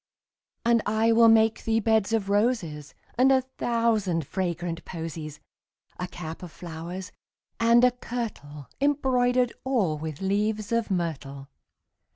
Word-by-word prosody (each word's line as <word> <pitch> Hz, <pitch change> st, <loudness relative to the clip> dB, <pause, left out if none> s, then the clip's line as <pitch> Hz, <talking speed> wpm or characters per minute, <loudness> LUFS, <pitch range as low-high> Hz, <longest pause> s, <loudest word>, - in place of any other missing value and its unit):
And 235 Hz, -1 st, +4 dB
I 220 Hz, +2 st, +2 dB
will 230 Hz, 0 st, +6 dB
make 225 Hz, 0 st, +4 dB
thee 225 Hz, 0 st, +1 dB
beds 220 Hz, -1 st, +2 dB
of 220 Hz, -3 st, 0 dB
roses 200 Hz, -, 0 dB, 0.2 s
And 265 Hz, +1 st, +6 dB
a 260 Hz, -1 st, +4 dB, 0.2 s
thousand 220 Hz, -9 st, +1 dB
fragrant 175 Hz, -1 st, -3 dB
posies; 160 Hz, -3 st, -6 dB, 0.6 s
10 180 Hz, -, -2 dB
A -, -, -7 dB
cap 165 Hz, -2 st, -7 dB
of 180 Hz, -3 st, -8 dB
flowers, 175 Hz, +3 st, -7 dB, 0.5 s
and 235 Hz, +1 st, +5 dB
a 250 Hz, -, +6 dB
kirtle 215 Hz, -, -6 dB
Embroider'd 255 Hz, -4 st, +2 dB
all 205 Hz, -, 0 dB
with 155 Hz, -2 st, -6 dB
leaves 210 Hz, +3 st, -1 dB
of 230 Hz, -1 st, 0 dB
myrtle. 140 Hz, -7 st, -3 dB
205 Hz, 135 wpm, -26 LUFS, 165-230 Hz, 0.6 s, will